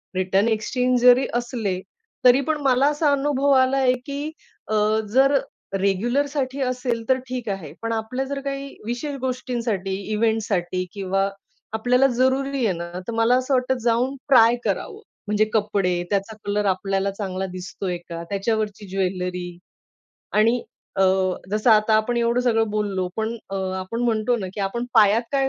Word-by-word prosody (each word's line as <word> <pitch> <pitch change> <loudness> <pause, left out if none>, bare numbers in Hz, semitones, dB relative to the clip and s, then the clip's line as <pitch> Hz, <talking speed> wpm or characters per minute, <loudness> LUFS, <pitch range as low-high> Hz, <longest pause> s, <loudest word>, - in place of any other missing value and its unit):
Return, 190 +3 +2
exchange 250 +3 +1
जरी 250 +2 +6
असले 235 -6 -2 0.5
तरी 250 +1 +7
पण 310 +3 -1
मला 265 -1 +3
असा 295 0 +1
अनुभव 280 0 +1
आला 265 0 +3 0.2
की 285 +2 -4 0.4
अ, 215 - -1 0.4
जर 275 +2 +5 0.4
रेग्युलरसाठी 260 +8 0
असेल 250 -2 -1
तर 260 - +5
ठीक 250 -2 -5
आहे. 190 -7 -4
पण 230 0 -2
आपल्या 225 +4 -2
जर 280 +1 -4
काही 275 0 -4 0.2
विशेष 245 +5 -3
गोष्टींसाठी, 240 -6 -2 0.2
इव्हेंटसाठी 210 -5 0
किंवा 195 0 0 0.4
आपल्याला 250 +4 +3
जरुरी 265 0 +1
आहे 200 - +2
ना, 170 0 -6 0.2
तर - - -2
मला 230 +2 +3
असं 255 +2 -1
वाटत 255 0 +1
जाऊन 240 +3 +1
ट्राय 235 -3 +7
करावं. - - -3 0.3
म्हणजे 210 +1 +2
कपडे, 200 -5 +1
त्याचा 200 +2 -1
कलर 205 0 0
आपल्याला 195 +1 0
चांगला 190 -2 -4
दिसतोय 185 0 -4
का? 170 0 -5
त्याच्यावरची 210 0 -2
ज्वेलरी 180 -2 -3 0.8
आणि 230 +3 +3 0.3
अ, 195 - +3 0.5
जसं 215 +3 +2
आता 215 0 +5
आपण 220 +3 +1
एवढं 235 +1 +2
सगळं 225 -3 +1
बोललो 200 -3 -1
पण 220 +1 -2
अ, - - -4 0.3
आपण 190 +5 -4
म्हणतो 235 0 +1
ना 200 -5 -4
की - - -4
आपण 200 +5 -2
पायात 215 +1 +5
काय 270 -1 +2
225 Hz, 150 wpm, -23 LUFS, 200-255 Hz, 0.8 s, तरी